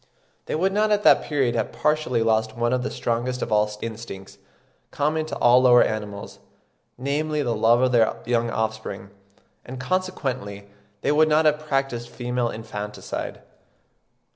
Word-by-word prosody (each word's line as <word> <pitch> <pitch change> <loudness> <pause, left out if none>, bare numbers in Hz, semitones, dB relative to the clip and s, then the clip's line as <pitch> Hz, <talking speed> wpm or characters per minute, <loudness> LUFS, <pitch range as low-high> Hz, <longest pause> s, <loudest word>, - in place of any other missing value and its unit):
They - - -2
would 190 +4 +1
not 215 +1 +2
at 210 0 +2
that - - +6
period 135 -5 0
have 115 -2 -1
partially 150 -6 0
lost 110 0 0
one 120 +1 +1
of 125 - +1
the 130 - -2
strongest 125 +2 -2
of 115 - -5
all 105 0 +3
instincts, 110 -4 -8 0.5
common 155 +2 -1
to - - -5
all 120 +1 +5
the 130 - +5
lower 120 0 +7
animals, 105 -2 -5 0.6
namely 145 +3 -1
the 120 -3 0
love 115 +2 +3
of 130 -1 +3
their 115 -3 +3
young 120 -1 +1
offspring; 110 -3 -4 0.5
and 130 +1 -8
consequently 130 - -3 0.3
they - - +1
would 155 +1 +4
not 155 +1 +3
have 150 0 +3
practised 135 -4 -1
female 120 -1 -2
infanticide. 105 -2 -6
120 Hz, 160 wpm, -24 LUFS, 110-145 Hz, 0.6 s, lower